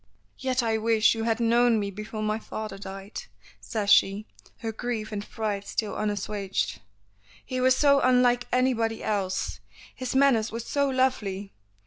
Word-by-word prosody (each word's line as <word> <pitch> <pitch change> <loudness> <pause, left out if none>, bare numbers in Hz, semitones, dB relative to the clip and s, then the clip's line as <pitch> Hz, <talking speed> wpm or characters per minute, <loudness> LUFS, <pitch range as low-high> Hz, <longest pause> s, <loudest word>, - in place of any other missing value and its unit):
"Yet 260 -1 0
I 220 -1 +1
wish 220 -1 +4
you 225 -1 -3
had 225 0 +1
known 235 0 +4
me 200 -1 -2
before 215 +2 -6
my 215 +1 0
father 215 -3 -6
died," 195 +1 -7 0.4
says 205 -2 -2
she, 205 +1 +4 0.4
her 225 - -2
grief 225 -1 -4
and 205 -1 -5
pride 205 -3 -3
still 215 -2 -2
unassuaged. 205 - -2 0.6
"He 255 0 -3
was 255 0 +5
so 280 -1 +5
unlike 250 -1 +3
anybody 235 -3 +1
else. 195 -3 -2 0.3
His 255 0 -4
manners 265 -5 +4
were 230 - -4
so 280 +4 0
lovely. 210 -7 -1
225 Hz, 150 wpm, -26 LUFS, 205-245 Hz, 0.6 s, was